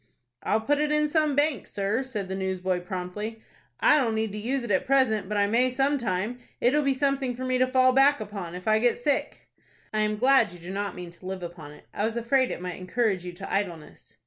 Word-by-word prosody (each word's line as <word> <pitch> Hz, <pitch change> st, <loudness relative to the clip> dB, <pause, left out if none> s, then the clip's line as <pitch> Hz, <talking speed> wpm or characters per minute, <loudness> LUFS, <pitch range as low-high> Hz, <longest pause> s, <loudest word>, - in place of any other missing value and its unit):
"I'll 220 Hz, -, +1 dB
put 290 Hz, +6 st, +1 dB
it 300 Hz, 0 st, +1 dB
in 300 Hz, 0 st, +2 dB
some 305 Hz, -2 st, +1 dB
bank, 290 Hz, -6 st, +1 dB
sir," 205 Hz, +5 st, -1 dB
said 230 Hz, -7 st, -5 dB
the 190 Hz, -, -4 dB
newsboy, 190 Hz, -1 st, -1 dB
promptly. 190 Hz, +5 st, -5 dB, 0.4 s
"I 300 Hz, -, +5 dB
don't 230 Hz, -5 st, 0 dB
need 220 Hz, -1 st, -1 dB
to 210 Hz, -, -5 dB
use 255 Hz, +4 st, -2 dB
it 240 Hz, -, -4 dB
at 190 Hz, -, +1 dB
present, 240 Hz, -7 st, +2 dB
but 210 Hz, -, -1 dB
I 200 Hz, -, +4 dB
may 235 Hz, +5 st, +2 dB
some 275 Hz, +3 st, +1 dB
time. 220 Hz, +2 st, -2 dB, 0.2 s
It'll 285 Hz, +5 st, +3 dB
be 275 Hz, -2 st, +1 dB
something 275 Hz, -2 st, 0 dB
for 255 Hz, +2 st, -5 dB
me 255 Hz, 0 st, +1 dB
to 255 Hz, -, +4 dB
fall 255 Hz, 0 st, +5 dB
back 275 Hz, +1 st, +5 dB
upon, 200 Hz, -5 st, -6 dB
if 180 Hz, +2 st, -8 dB
I 215 Hz, 0 st, +4 dB
get 240 Hz, +1 st, +2 dB
sick." 275 Hz, +3 st, -1 dB, 0.5 s
"I 215 Hz, -, 0 dB
am 215 Hz, 0 st, +1 dB
glad 250 Hz, -4 st, +4 dB
you -, -, -10 dB
do 175 Hz, +2 st, -8 dB
not 200 Hz, 0 st, -3 dB
mean 180 Hz, -1 st, -8 dB
to 175 Hz, +2 st, -12 dB
live 190 Hz, -1 st, -5 dB
upon 170 Hz, -4 st, -8 dB
it. -, -, -17 dB
I -, -, -2 dB
was 225 Hz, +2 st, -1 dB
afraid 255 Hz, +2 st, +2 dB
it -, -, -4 dB
might 180 Hz, 0 st, -5 dB
encourage 195 Hz, 0 st, 0 dB
you 180 Hz, -1 st, -6 dB
to 195 Hz, +3 st, -7 dB
idleness." 175 Hz, -6 st, -4 dB
220 Hz, 240 wpm, -26 LUFS, 190-260 Hz, 0.5 s, I